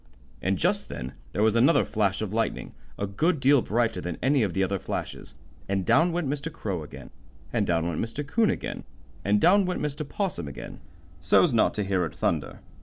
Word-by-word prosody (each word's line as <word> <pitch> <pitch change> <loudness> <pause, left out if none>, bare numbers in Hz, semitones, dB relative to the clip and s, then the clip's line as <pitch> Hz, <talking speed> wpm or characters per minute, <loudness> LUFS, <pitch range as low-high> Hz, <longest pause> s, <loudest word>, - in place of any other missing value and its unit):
And - - 0
just - - 0
then 65 +1 -6 0.2
there 105 - 0
was 110 0 +3
another 130 +8 +4
flash 105 -1 0
of 105 -1 -4
lightning, 115 0 -2 0.2
a 100 - -1
good 155 - 0
deal 135 0 +5
brighter 115 -4 0
than 90 -2 -4
any 135 +1 +3
of 100 -5 0
the 95 - +1
other 95 0 -1
flashes, - - -5 0.3
and 95 -2 0
down 165 - +4
went 170 -3 -1
Mr. 145 +3 -3
Crow 100 - -4
again, 75 - -10 0.4
and - - +1
down 85 -1 +1
went 85 -3 -2
Mr. 125 +6 -4
'Coon 215 +9 +2
again, - - -3 0.4
and 105 +1 +3
down 195 - +5
went 180 - -2
Mr. 150 0 -3
'Possum 180 - -2
again, 70 - -8 0.4
so's 90 - +4
not 115 - +3
to 105 - -1
hear 95 -2 0
it 80 -5 -4
thunder. - - -2
110 Hz, 200 wpm, -26 LUFS, 95-150 Hz, 0.4 s, deal